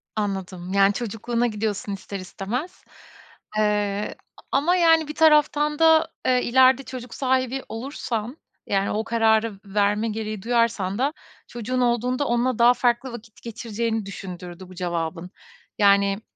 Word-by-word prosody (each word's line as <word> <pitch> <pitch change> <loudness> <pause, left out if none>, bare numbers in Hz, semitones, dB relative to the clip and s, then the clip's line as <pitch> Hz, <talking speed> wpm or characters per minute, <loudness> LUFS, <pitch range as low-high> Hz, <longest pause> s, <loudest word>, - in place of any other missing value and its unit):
Anladım. 190 -3 -4
Yani, 200 0 +4
çocukluğuna 235 +2 -2
gidiyorsun 210 -2 -3
ister 195 0 -6
istemez, 235 - -5 0.7
eee, 210 -1 0 0.4
ama 310 +6 +3
yani 325 -3 +4
bir 300 - -6
taraftan 300 -1 +3
da, 320 0 +5 0.2
eee, 250 -1 +3
ileride 260 +2 +4
çocuk 250 -2 -8
sahibi 260 0 0
olursan, 235 +1 -4 0.3
yani, 195 0 0
o 215 +1 -1
kararı 220 -2 +1
verme 205 +2 +1
gereği 215 -2 -4
duyarsan 230 -5 0
da 275 +5 0 0.3
çocuğun 250 +2 -3
olduğunda 250 +3 +1
onunla 240 0 0
daha 240 +1 +7
farklı 245 +1 0
vakit 225 -2 -11
geçireceğini 230 -2 -3
düşündürdü 180 -2 -8
bu 185 - -12
cevabın. 175 0 -3 0.5
Yani, 200 0 +3
225 Hz, 130 wpm, -24 LUFS, 200-255 Hz, 0.7 s, daha